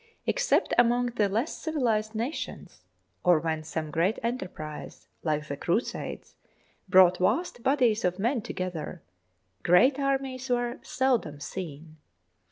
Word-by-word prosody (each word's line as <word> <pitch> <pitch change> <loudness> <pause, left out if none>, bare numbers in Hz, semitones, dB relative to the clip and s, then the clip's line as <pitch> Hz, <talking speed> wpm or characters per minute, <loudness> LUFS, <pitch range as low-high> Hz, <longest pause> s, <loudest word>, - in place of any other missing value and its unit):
Except - - +2
among 245 0 +3
the 210 -4 +2
less 225 +10 -1
civilised 230 -9 0
nations, 240 +8 -5 0.4
or 175 -2 +5
when 160 0 -2
some 155 -1 -4
great 175 +8 +1
enterprise 185 -10 -5
like 150 -1 -1
the 140 - -3
Crusades 175 - -2 0.6
brought 185 -1 +6
vast 245 - 0
bodies 245 -4 +2
of 180 0 +1
men 235 +4 0
to 230 - -6
gether, 180 -2 -5 0.6
great 255 +11 +5
armies 270 -2 -1
were 245 0 0
seldom 245 - 0
seen. 160 -1 -7
215 Hz, 125 wpm, -28 LUFS, 170-250 Hz, 0.6 s, brought